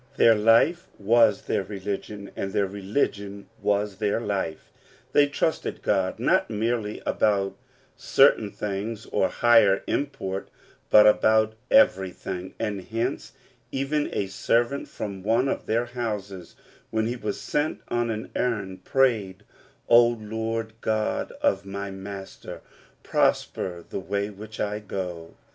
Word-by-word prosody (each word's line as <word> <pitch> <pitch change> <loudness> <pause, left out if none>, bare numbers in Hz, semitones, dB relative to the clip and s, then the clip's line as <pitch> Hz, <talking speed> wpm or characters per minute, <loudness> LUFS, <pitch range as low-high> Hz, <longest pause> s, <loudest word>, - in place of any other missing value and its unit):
Their 115 - +7
life 115 +11 +3
was 105 0 +4
their - - 0
religion, 100 +1 -6
and 95 - -3
their 100 - +2
religion 100 0 -3
was 100 -1 0
their 105 +1 0
life. 95 -8 -3 0.4
They 145 0 +5
trusted 145 +3 -2
God, 95 -2 +1
not - - +2
merely 110 0 -2
about 100 -2 +1 0.4
certain 105 - +4
things 105 +2 -4
of 95 - 0
higher 115 -5 +4
import, 135 -10 -3 0.4
but 105 0 +8
about 110 +1 +4 0.2
everything, 95 - +2
and 105 -3 -2
hence, 115 +5 -3 0.4
even 140 +2 -1
a 100 - -1
servant 120 +7 0
from 100 -2 -6
one 115 +6 +2
of - - -3
their 115 +2 +1
houses, 105 -7 -5 0.3
when 110 0 0
he 120 +2 -2
was 105 -4 -4
sent 150 +1 -1
on 120 0 0
an 110 -1 -4
errand, 100 -6 -2
prayed, 105 -7 +1 0.4
"O 120 0 +7
Lord 110 0 -3
God 110 -1 -1
of 95 0 +2
my 100 0 -5
master, 95 0 -8 0.4
prosper 85 -2 0
the - - -4
way 100 +2 -2
which 110 +2 -10
I 105 0 -1
go 90 -5 -6
105 Hz, 130 wpm, -25 LUFS, 100-115 Hz, 0.4 s, but